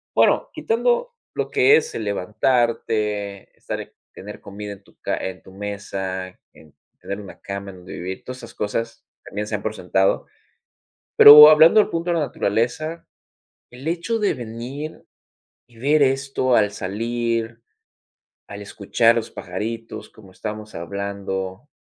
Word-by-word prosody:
bueno, - - +3
quitando 485 +1 0 0.2
lo - - -2
que 420 0 +5
es - - 0
el 110 - -4
levantarte, 105 -1 -1
estar - - -6 0.2
tener 105 +2 -10
comida 100 0 -8
en 100 0 -16
tu - - -24
ca - - -1
en 95 0 -5
tu - - -15
mesa, 95 -2 -5 0.3
en 75 -2 -19 0.3
tener 100 - -5
una 100 - -12
cama 100 0 -6
en 95 - -14
donde 90 0 -13
vivir, 95 +2 -6
todas 125 0 -7
esas - - -11
cosas 115 +2 -4 0.2
también 105 +1 -5
se 105 - -2
dan 105 - -5
por 110 0 -3
sentado. 95 0 +1 0.9
Pero 150 +1 +12
hablando 160 +6 +7
del 210 - +3
punto 170 +1 -3
de 170 - +2
la 160 -3 +1
naturaleza, 140 +11 -2 0.6
el 125 +4 -12
hecho 175 +7 -1
de 210 -2 +1
venir 125 +6 -7 0.7
y 120 - -22
ver 145 +5 +2
esto 135 -1 +1
al 105 -2 +3
salir, 115 +3 -3 0.9
al 100 0 -9
escuchar 115 +3 +2
los 115 -1 -2
pajaritos, 115 +5 -6
como 100 -4 -17
estamos 105 +2 -7
hablando, 95 - -5
110 Hz, 150 wpm, -22 LUFS, 100-135 Hz, 0.9 s, Pero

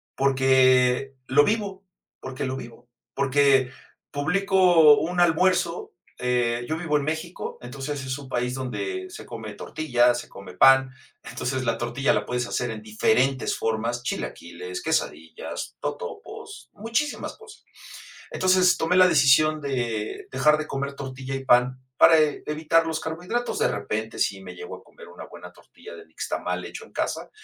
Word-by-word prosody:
Porque 130 -1 +3
lo 145 +2 +5
vivo 200 -2 -2 0.4
porque 130 +1 -5
lo 130 0 -3
vivo. 120 0 -11 0.2
Porque 135 -1 +3 0.4
publicó 175 -1 +4
un 175 +2 -2
almuerzo, 175 0 +2 0.2
eh, 120 -1 0
yo 155 - -1
vivo 160 -2 0
en 145 - -2
México, 160 +4 -5
entonces 135 +3 -5
es 130 +1 -3
un 140 - -10
país 125 0 -2
donde 375 - -4
se - - -10
come 110 -2 -7
tortillas, 120 -1 +1
se - - -15
come 95 -2 -12
pan. 135 0 +6 0.3
Entonces 130 0 -4
la 115 -1 0
tortilla 120 +4 0
la - - -1
puedes 125 -1 -2
hacer 120 - -2
en 110 -1 -7
diferentes 125 +5 +1
formas: 115 +2 -2
chilaquiles, 90 -4 -5
quesadillas, 80 +1 -3
totopos, - - -7
muchísimas 230 +8 -2
cosas. 450 -1 -15 0.7
Entonces, 185 -1 +3
tomé 165 +3 0
la 185 0 +7
decisión 155 0 +4
de 120 -6 -3
dejar 150 +4 +3
de 155 - -4
comer 140 -1 -4
tortilla 135 0 -6
y 135 0 -6
pan 125 +1 +3 0.2
para 160 +3 +7
evitar 155 +2 +1
los 160 -1 -2
carbohidratos. 180 - -3
De - - +3
repente, - - -4
sí - - -1
me - - -10
llego 440 +1 -8
a - - -18
comer 470 -1 -15
una 475 - -10
buena - - -12
tortilla 455 +3 -14
de 425 -1 -13
nixtamal - - -4
hecho - - -9
en - - -21
casa, - - -3
140 Hz, 155 wpm, -24 LUFS, 125-165 Hz, 0.7 s, la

